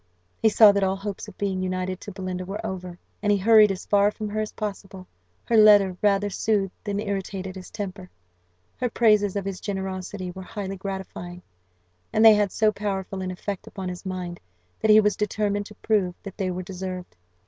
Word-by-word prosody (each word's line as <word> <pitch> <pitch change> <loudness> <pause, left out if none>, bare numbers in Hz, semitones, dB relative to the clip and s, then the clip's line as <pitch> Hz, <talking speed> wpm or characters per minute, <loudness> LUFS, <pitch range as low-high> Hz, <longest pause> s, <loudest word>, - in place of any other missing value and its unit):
He 220 - +5
saw 215 -1 +8
that 200 0 0
all 190 0 +1
hopes 200 +1 -6
of 210 - -12
being 195 -2 -1
united 185 0 -3
to 205 - -8
Belinda 185 -1 -4
were 195 +3 -6
over, 180 -2 -5 0.2
and 205 0 +2
he 205 - +4
hurried 215 +1 +6
as 190 - -5
far 205 0 +4
from 210 0 -5
her 215 +1 -3
as 215 - -4
possible. 195 -3 -6 0.4
Her 235 - +1
letter 205 -3 +7
rather 205 -1 +3
soothed 200 -2 0
than 205 -1 -2
irritated 195 -2 -4
his 185 -1 -9
temper; 190 -3 -6 0.7
her 250 - -1
praises 210 -4 +3
of 200 -1 -2
his 195 -2 -5
generosity 190 -1 -4
were 190 +1 -9
highly 195 0 -6
gratifying, 185 -2 -6 0.7
and 220 - +4
they 220 - +10
had 205 -2 +2
so 215 -1 +3
powerful 195 -2 -3
an 185 - -3
effect 185 +1 -5
upon 190 -2 -5
his 180 0 -7
mind, 180 -2 -5 0.4
that 220 - 0
he 215 0 +9
was 210 -1 +2
determined 205 -1 -1
to 210 - -13
prove 200 -5 0
that 195 - -8
they 190 -3 -2
were 180 0 -4
deserved. 185 0 -6
195 Hz, 195 wpm, -25 LUFS, 185-210 Hz, 0.7 s, they